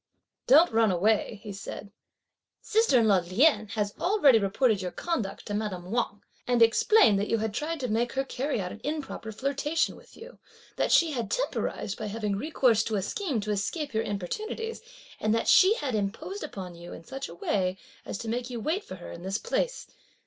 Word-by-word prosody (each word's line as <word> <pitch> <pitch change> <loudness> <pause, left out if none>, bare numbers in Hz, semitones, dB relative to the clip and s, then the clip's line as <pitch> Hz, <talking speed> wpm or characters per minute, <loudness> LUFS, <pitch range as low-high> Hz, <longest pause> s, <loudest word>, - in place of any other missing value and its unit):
"Don't 305 +5 +7
run 225 -1 +3
away," 210 +3 +1
he 210 -2 -6
said; 200 +1 -8 0.7
"sister 445 - +3
in 220 - +3
law 195 -3 +5
Lien 215 - +3
has 205 -1 -1
already 345 - +5
reported 205 +1 +1
your 180 - -3
conduct 235 - -3
to 205 - -5
madame 195 -4 -3
Wang; 225 -3 -1 0.2
and 245 -2 +5
explained 225 - +5
that 205 - -1
you 230 - +1
had 220 -1 -2
tried 315 +6 -3
to 250 - -1
make 235 +2 0
her 270 - 0
carry 270 -1 -2
on 180 -2 -3
an 215 - -10
improper 290 -7 -4
flirtation 280 +7 -1
with - - -17
you; - - -12 0.4
that - - 0
she 335 -2 +5
had 235 -7 -3
temporised 220 - -2
by 215 - -3
having 210 -1 -2
recourse 245 -2 +2
to 220 - -2
a 200 - 0
scheme 290 - -2
to 210 +1 -3
escape 260 - -2
your 220 - +1
importunities, 330 - -4 0.4
and 215 +1 +1
that 230 - -1
she 385 +4 +6
had 285 - -3
imposed 215 - -3
upon 190 -11 -7
you 170 +1 -10
in - - -10
such 270 +7 -6
a 170 - -10
way 185 +1 -1 0.3
as - - -5
to 225 - -7
make 240 +2 -2
you 240 -2 -5
wait 330 - -1
for 185 - -8
her 180 - -10
in 170 - -9
this 190 +2 -2
place. - - -2
225 Hz, 200 wpm, -28 LUFS, 200-295 Hz, 0.7 s, Don't